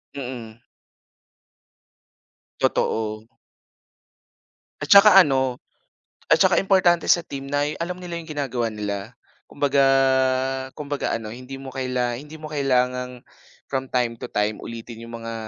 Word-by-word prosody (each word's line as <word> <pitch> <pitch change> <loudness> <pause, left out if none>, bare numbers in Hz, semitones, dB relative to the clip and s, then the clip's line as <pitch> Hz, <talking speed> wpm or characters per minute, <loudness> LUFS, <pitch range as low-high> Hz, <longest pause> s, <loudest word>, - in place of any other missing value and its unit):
Mm. 120 -5 -7 2.0
Totoo. 110 0 -1 1.5
At 145 - -2
saka 200 0 +8
ano, 130 -7 +4 0.7
at - - +6
saka - - +4
importante 180 -3 +3
sa 170 -1 +4
team 135 0 -7
na 145 0 +1
y 150 - -2
alam 180 +1 -3
nila 180 -1 -8
'yong 160 - -14
ginagawa 130 -6 -2
nila. 105 +1 -5 0.3
Kumbaga 140 -1 +1 1.0
kumbaga 145 -1 -3
ano, 110 -1 -8
hindi 130 +2 -9
mo 135 -1 -9
kaila 125 -2 -1
hindi 150 +6 -9
mo 155 - -10
kailangang 125 -4 -1 0.4
from 135 -1 -4
time 120 -2 0
to - - -6
time 105 +1 -1
ulitin 115 0 -8
'yong 115 0 -8
mga 115 - -4
130 Hz, 130 wpm, -23 LUFS, 115-145 Hz, 2.0 s, saka